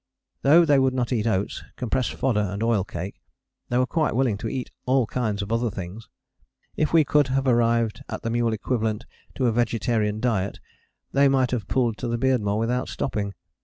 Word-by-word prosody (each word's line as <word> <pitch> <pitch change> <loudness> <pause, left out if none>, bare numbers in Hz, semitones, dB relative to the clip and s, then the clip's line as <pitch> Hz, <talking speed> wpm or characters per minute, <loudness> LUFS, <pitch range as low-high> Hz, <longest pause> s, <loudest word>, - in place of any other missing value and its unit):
" - - -55
Though 160 +5 +6
they 145 -3 +4
would 130 -1 +2
not 125 0 0
eat 115 -1 0
oats, 100 -3 -1
compressed 125 +1 -1
fodder 125 -5 +1
and 100 +1 -2
oil 115 -4 +2
cake, 90 0 -7 0.5
they 120 - +1
were 130 - +3
quite 155 -3 0
willing 125 -4 +2
to - - -3
eat 130 -2 -4 0.2
all 130 -1 +3
kinds 105 -3 -2
of 100 - -7
other 115 +1 +1
things. 95 +2 -8 0.7
If 155 - 0
we 165 -1 +6
could 145 -1 +3
have 135 +1 0
arrived 115 -3 +2
at - - -5
the 115 - -1
mule 120 -1 +1
equivalent 110 0 -1 0.3
to 130 - 0
a 120 - +3
vegetarian 110 -2 0
diet 110 -5 -1 0.5
they 140 +1 +4
might 135 -2 +2
have 115 -7 -2
pulled 120 -4 0
to 120 - -3
the 120 0 -1
Beardmore 115 -5 +1
without 120 +3 -1
stopping. 100 -6 -3
120 Hz, 200 wpm, -24 LUFS, 105-130 Hz, 0.7 s, Though